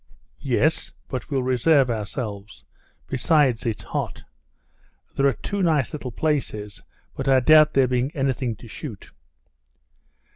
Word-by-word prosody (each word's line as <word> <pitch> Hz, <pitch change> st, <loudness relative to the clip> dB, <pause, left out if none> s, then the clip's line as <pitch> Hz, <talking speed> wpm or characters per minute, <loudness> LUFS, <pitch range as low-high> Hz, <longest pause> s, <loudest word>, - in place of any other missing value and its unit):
"Yes; -, -, 0 dB, 0.2 s
but 125 Hz, -2 st, -5 dB
we'll 135 Hz, -3 st, 0 dB
reserve 130 Hz, +1 st, +3 dB
ourselves; 105 Hz, -2 st, -5 dB, 0.4 s
besides 130 Hz, -3 st, +2 dB
it's 110 Hz, -, -3 dB
hot. -, -, -4 dB, 0.9 s
There 140 Hz, -, +3 dB
are 135 Hz, -, +2 dB
two 200 Hz, -1 st, -4 dB
nice 155 Hz, -7 st, +1 dB
little 145 Hz, -4 st, -5 dB
places, 110 Hz, -8 st, -2 dB, 0.3 s
but 135 Hz, -, -4 dB
I 135 Hz, -1 st, +5 dB
doubt 155 Hz, +3 st, +6 dB
there 135 Hz, -2 st, +4 dB
being 125 Hz, +1 st, 0 dB
anything 130 Hz, -4 st, -1 dB
to 115 Hz, -, -13 dB
shoot." 115 Hz, -, -9 dB
130 Hz, 125 wpm, -23 LUFS, 115-145 Hz, 0.9 s, doubt